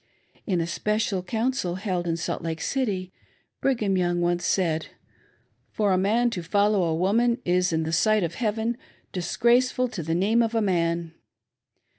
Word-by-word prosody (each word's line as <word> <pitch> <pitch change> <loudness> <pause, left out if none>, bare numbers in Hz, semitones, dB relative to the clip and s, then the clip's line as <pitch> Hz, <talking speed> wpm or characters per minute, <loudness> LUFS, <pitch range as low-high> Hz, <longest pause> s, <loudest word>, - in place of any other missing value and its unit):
In 185 -5 +1
a 165 - 0
special 210 +2 -1
council, 225 -2 -1
held 185 -2 -2
in 165 -1 0
Salt 165 - -3
Lake. 160 -1 -4
City,, 195 -9 -2 0.5
Brigham 220 -8 +1
Young 175 -1 +1
once 175 0 0
said: 160 -4 0 0.4
" - - -41
For 210 -2 +2
a 185 - +3
man 230 +5 +2
to 185 - -3
follow 200 +2 +2
a 160 -1 0
woman 230 +7 +2
is, 180 +1 +2
in 160 0 0
the 160 +1 -3
sight 215 +4 +3
of 170 -1 -2
Heaven, 225 +2 -1 0.3
disgraceful 245 +7 +2
to 215 -7 -5
the 165 +1 -2
name 210 +6 +3
of 230 0 0
a - - +3
man." 170 -4 0
190 Hz, 170 wpm, -25 LUFS, 175-225 Hz, 0.5 s, a